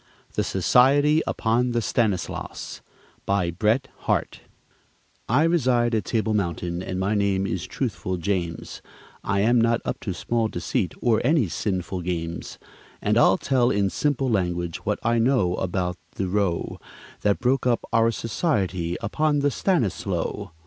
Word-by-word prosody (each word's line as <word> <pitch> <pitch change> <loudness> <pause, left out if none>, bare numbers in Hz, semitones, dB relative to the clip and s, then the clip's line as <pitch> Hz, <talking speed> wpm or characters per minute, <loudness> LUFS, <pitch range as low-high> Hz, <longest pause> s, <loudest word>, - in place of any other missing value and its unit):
THE - - 0
SOCIETY 145 +5 +4
UPON 120 +2 +1
THE 120 - +2
STANISLAUS 105 -9 -2 0.5
BY 95 -3 +1
BRET 110 +8 +1 0.2
HARTE - - 0 0.9
I 130 +7 +4
reside 125 -8 +2
at 110 -4 0
Table 110 0 0
Mountain, 85 -3 -2
and 95 0 -4
my 95 +3 0
name 100 -2 +1
is - - -3
Truthful 95 0 -3
James; 85 -2 -3 0.4
I 100 0 +1
am 120 +3 +4
not 115 +1 +2
up - - -3
to 95 - -4
small 115 +4 0
deceit, 90 -4 -2
or 115 -3 +3
any 140 - +3
sinful 95 0 -2
games; 85 -1 -4 0.4
And - - +1
I'll - - +5
tell 125 -3 +2
in 100 -4 +1
simple 135 - 0
language 90 -6 -1
what - - -2
I 115 +1 +2
know 115 -7 +2
about 90 -1 -2 0.2
the 95 - -2
row 95 -2 -1 0.4
That 105 -1 +2
broke 125 0 +1
up 120 -2 +1
our 115 0 +4
society 95 - -1
upon 150 +6 +1
the 145 0 +2
Stanislow. 100 - -1
105 Hz, 145 wpm, -24 LUFS, 90-120 Hz, 0.9 s, I'll